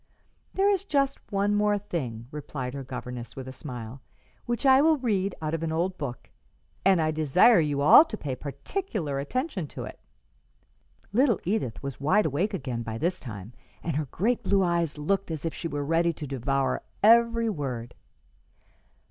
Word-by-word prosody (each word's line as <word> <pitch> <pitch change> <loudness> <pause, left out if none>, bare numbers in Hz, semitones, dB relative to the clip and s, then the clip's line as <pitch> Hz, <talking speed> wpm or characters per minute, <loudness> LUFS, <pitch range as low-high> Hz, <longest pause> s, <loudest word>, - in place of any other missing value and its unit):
"There 390 +1 +3
is 395 -2 +2
just 275 -7 0
one 200 0 +1 0.3
thing 155 - -4
more," 115 - -11
replied 135 -4 -5
her 140 -1 -5
governess, 125 -2 -7
with 130 -1 -7
a 130 - -7
smile, 125 -3 -8 0.5
"which 240 +3 -2
I 265 0 +7
will 315 +1 +4
read 200 -7 0
out 155 0 -2
of 165 - -1
an 165 -1 -2
old 175 +4 0
book; 125 -5 -5 0.6
and 190 -2 +5
I 155 -1 +2
desire 160 - +5
you 145 -3 0
all 155 - +9
to 215 - -6
pay 135 -8 -4
particular 150 - -4
attention 210 - -2
to - - -7
it." - - -9 1.1
Little 240 -2 +3
Edith 180 - -2
was 140 -1 -6
wide 190 +9 +3
awake 175 +8 0
again 125 -7 -4
by 115 -1 -5
this 175 +7 -1
time, 110 -3 -8 0.3
and 165 -4 -2
her 150 0 0
great 225 - 0
blue 195 -2 +2
eyes 170 -3 0
looked 195 +6 -1
as 160 -1 -4
if 165 - -2
she 170 - -4
were 145 -2 -3
ready 165 +2 +2
to 150 - -7
devour 135 0 -1 0.2
every 230 +1 +5
word. 125 - -4
160 Hz, 175 wpm, -27 LUFS, 135-205 Hz, 1.1 s, all